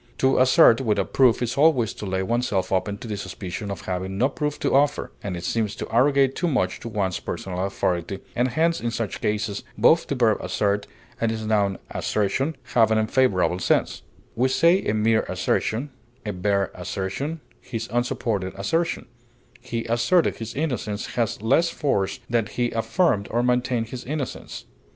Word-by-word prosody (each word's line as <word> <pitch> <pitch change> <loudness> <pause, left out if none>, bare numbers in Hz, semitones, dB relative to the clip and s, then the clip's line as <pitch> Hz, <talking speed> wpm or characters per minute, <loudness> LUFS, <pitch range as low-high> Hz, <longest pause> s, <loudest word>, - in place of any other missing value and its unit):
To 130 0 +3
assert 130 -2 +6
without 105 -6 0
proof 125 -2 +4
is 120 - -2
always 135 -8 +4
to 105 - -7
lay 95 0 -1
oneself 115 -3 -1
open 100 +2 0
to 115 - -9
the 105 - -3
suspicion 100 +1 -6
of 100 -4 -5
having 95 +1 -4
no 130 +6 +3
proof 150 +1 -3
to - - +1
offer, 140 +2 +2
and 90 -4 -5
seems 110 +1 -1
to - - -5
arrogate 135 +2 +4
too 175 - 0
much 125 - 0
to 115 - -7
one's 100 -4 -1
personal 90 -1 -4
authority, 95 -1 -1 0.2
and 120 +2 +2
hence 165 +6 +1
in 120 - -1
such 115 -3 -4
cases 105 -1 -1 0.2
both 165 +1 +4
the 140 - -1
verb 115 -5 +3
assert 100 +2 0 0.3
and 115 -1 +1
its 110 -1 -4
noun 100 -3 +1
assertion 130 +9 -1 0.2
have 115 -2 +5
an 110 - +2
unfavorable 110 -5 +2
sense; - - +1 0.3
we 130 +3 +2
say 170 +8 +4
a 105 - +1
mere 110 +1 +3
assertion, 130 +6 -1 0.3
a 105 - -2
bare 100 +1 0
assertion, 95 - -4 0.2
his 115 -3 -5
unsupported 115 -5 -1
assertion; 165 +13 -1 0.5
he 120 -2 -4
asserted 120 +10 +2
his 115 0 -6
innocence 125 -8 -3
has 115 -3 -1
less 150 +9 +3
force 135 -13 -1
than 115 -3 +1
he 120 +1 -1
affirmed 115 - +1
or 120 +1 0
maintained 125 -2 0
his 125 0 -6
innocence. 140 0 -5
115 Hz, 170 wpm, -24 LUFS, 100-130 Hz, 0.5 s, assert